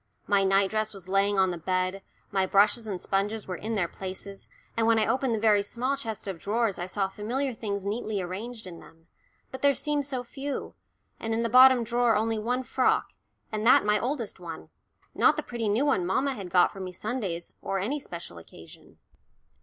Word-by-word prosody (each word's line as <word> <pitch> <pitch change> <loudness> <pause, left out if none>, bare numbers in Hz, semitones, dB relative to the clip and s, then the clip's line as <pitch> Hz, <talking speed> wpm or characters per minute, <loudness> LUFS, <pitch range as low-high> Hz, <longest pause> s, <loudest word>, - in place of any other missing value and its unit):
My 200 -1 +3
night 195 0 +3
dress 215 -1 -1
was 190 -2 -11
lying 195 +1 +2
on 190 -1 +3
the 175 - -5
bed, 185 +2 -1 0.3
my 190 -1 +1
brushes 210 +4 +3
and 190 -4 -3
sponges 200 +4 -1
were 185 - -3
in 220 +5 -4
their 185 -5 +1
places, 195 +2 -8 0.3
and 225 0 +2
when 230 -1 +5
I 215 - +3
opened 260 -2 +1
the - - -2
very 210 -2 +4
small 245 +6 -1
chest 220 -7 -5
of 190 -4 -4
drawers 220 +1 0
I 175 - -3
saw 195 +1 -1
familiar 240 +7 -2
things 200 -3 -4
neatly 215 0 -2
arranged 215 +6 -5
in 175 -2 -9
them. 165 +1 -17 0.5
But 260 - -7
there 280 -1 +4
seemed 295 0 -1
so 260 -3 -3
few 275 +3 -5 0.5
and 225 0 -2
in 230 - 0
the 230 - 0
bottom 255 0 +7
drawer 235 0 +2
only 220 +1 0
one 245 +4 -1
frock, - - +1 0.4
and 215 -1 -2
that 240 - +6
my 210 0 +3
oldest 240 -5 -3
one, 170 -2 -8 0.4
not - - +4
the - - -2
pretty 230 -3 -3
new 225 +8 +2
one 275 -11 +2
mamma 265 +10 +1
had 200 -7 -7
got 180 +2 +4
me 190 -1 -5
for - - -12
Sundays 205 -7 -3
or 195 - -2
any 235 +11 -1
special 170 - -8
occasion. 80 0 -15
210 Hz, 205 wpm, -27 LUFS, 190-240 Hz, 0.5 s, bottom